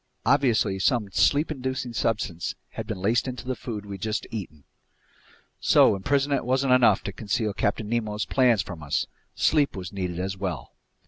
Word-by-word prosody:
Obviously 115 -7 +3
some 105 -1 +1
sleep 145 - +3
inducing 130 -3 -3
substance 105 -7 -1
had - - -6
been - - -3
laced 110 +8 +1
into 125 0 -5
the 130 0 -2
food 105 -5 -6
we'd 100 -2 -7
just 110 -1 -2
eaten! 80 -10 -7 1.0
So - - +5
imprisonment 140 +7 +1
wasn't 130 +1 +2
enough 120 -6 +5
to 100 - -5
conceal 105 +1 -1
Captain 105 +1 -1
Nemo's 110 -2 -1
plans 125 -6 +3
from 85 -5 -8
us—sleep 140 - 0
was 95 -1 -6
needed 90 -3 -3
as 95 +1 -2
well! 95 -7 -5
110 Hz, 155 wpm, -26 LUFS, 95-130 Hz, 1.0 s, So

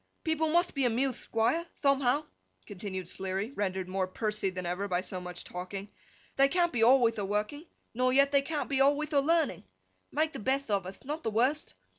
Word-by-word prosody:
People 320 -1 +1
mutht 345 +3 +2
be 275 - -1
amuthed, 245 +2 -1
Thquire, 275 +10 +1 0.2
thomehow,' 275 +1 +3 0.4
continued 190 -3 -6
Sleary, 190 +5 -3
rendered 190 -6 -2
more 185 0 -1
pursy 210 +1 -1
than 185 -1 -5
ever, 180 +3 -2
by 180 -2 0
so 185 -1 -4
much 180 0 -7
talking; 190 +3 -6 0.5
'they 275 0 +6
can't 345 +2 +2
be 240 - 0
alwayth 235 -2 +5
a - - -1
working, 210 - -2 0.3
nor 255 +2 +2
yet 275 +2 +4
they 280 -1 +4
can't 295 +1 -3
be 275 -1 0
alwayth 290 +3 +2
a 285 - +5
learning. 325 +3 +1 0.5
Make 310 +1 0
the - - -6
betht 265 +2 -1
of 195 -3 0
uth; 190 - -10
not 300 +4 -4
the 225 - -1
wurtht. 255 +8 0
245 Hz, 195 wpm, -30 LUFS, 195-285 Hz, 0.5 s, they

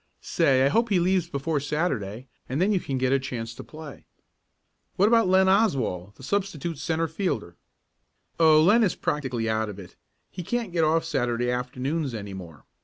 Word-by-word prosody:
Say, 130 -1 +2
I - - +4
hope 230 +9 +1
he 195 -4 +3
leaves 180 -1 +1
before 145 +1 -1
Saturday 135 - -2 0.2
and 130 +4 -2
then 190 +4 +2
you 195 - +2
can 135 -5 -3
get 130 +1 +1
a 135 - +3
chance 115 -4 -5
to - - -9
play." 155 -2 -11 0.9
"What 200 - +4
about 230 -3 +4
Len 190 +1 +4
Oswald, 130 - +1
the - - -15
substitute 170 -4 -2
centre 165 +1 -1
fielder?" 155 - -3 0.8
"Oh, 160 -2 +6
Len 215 +7 +5
is 195 - +1
practically 130 -6 -2
out 110 0 0
of 100 - -8
it. 95 -3 -12 0.4
He 180 - -6
can't 230 +1 -3
get 165 -2 +2
off 160 +1 +2
Saturday 120 0 0
afternoons 125 +3 -2
any 100 -2 -6
more. 85 -7 -10
145 Hz, 180 wpm, -25 LUFS, 120-180 Hz, 0.9 s, Oh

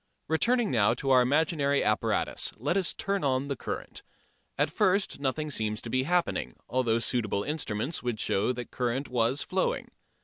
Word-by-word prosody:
Returning 235 +8 +2
now 110 -5 +3
to 135 - -1
our 130 -1 +7
imaginary 140 +1 +2
apparatus, 105 -3 +1
let 145 +10 -1
us 190 -3 +2
turn 200 -2 -2
on 135 0 0
the 140 - -1
current. - - -5 0.6
At - - +1
first 190 -3 +1
nothing 150 +2 -2
seems 110 -4 -1
to 115 - -6
be 130 +1 +1
happening, 180 -1 0
although 120 -2 +1
suitable 115 -4 0
instruments 145 -1 -2
would 120 -3 -3
show 105 +5 +1
that 125 -1 -7
current 125 +3 -2
was 125 +3 +1
flowing. - - -1
130 Hz, 165 wpm, -28 LUFS, 115-155 Hz, 0.6 s, our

